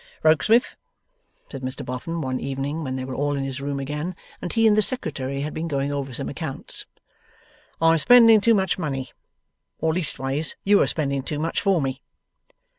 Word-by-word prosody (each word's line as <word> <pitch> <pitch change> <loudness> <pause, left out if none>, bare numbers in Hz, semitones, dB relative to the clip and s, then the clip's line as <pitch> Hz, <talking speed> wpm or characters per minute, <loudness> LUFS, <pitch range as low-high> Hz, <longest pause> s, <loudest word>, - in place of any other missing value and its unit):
'Rokesmith,' 185 - +4 0.8
said 135 - -7
Mr 130 0 -4
Boffin 160 +7 -4
one 130 -2 -2
evening 140 +4 -3
when 130 -2 -3
they 130 -1 -4
were 130 - -6
all 145 +2 0
in 135 - -2
his 135 0 -4
room 140 0 -3
again, 150 +6 -4 0.3
and 175 - -4
he 225 -1 +2
and 215 -1 +6
the 215 - +4
Secretary 140 - -2
had 150 +1 -4
been 165 +1 -3
going 140 -2 -1
over 140 -2 -3
some 135 +2 -4
accounts, 145 -2 -4 0.9
'I 165 0 +5
am 165 - +4
spending 230 0 +7
too 230 +2 +4
much 190 -1 0
money. 135 -5 -3 0.7
Or 160 0 0
leastways, 150 -3 -2
you 205 +1 +5
are - - +3
spending 140 -3 -1
too 145 +2 -4
much 160 +2 -1
for 195 -3 +3
me. 135 0 -3
145 Hz, 190 wpm, -24 LUFS, 135-170 Hz, 0.9 s, spending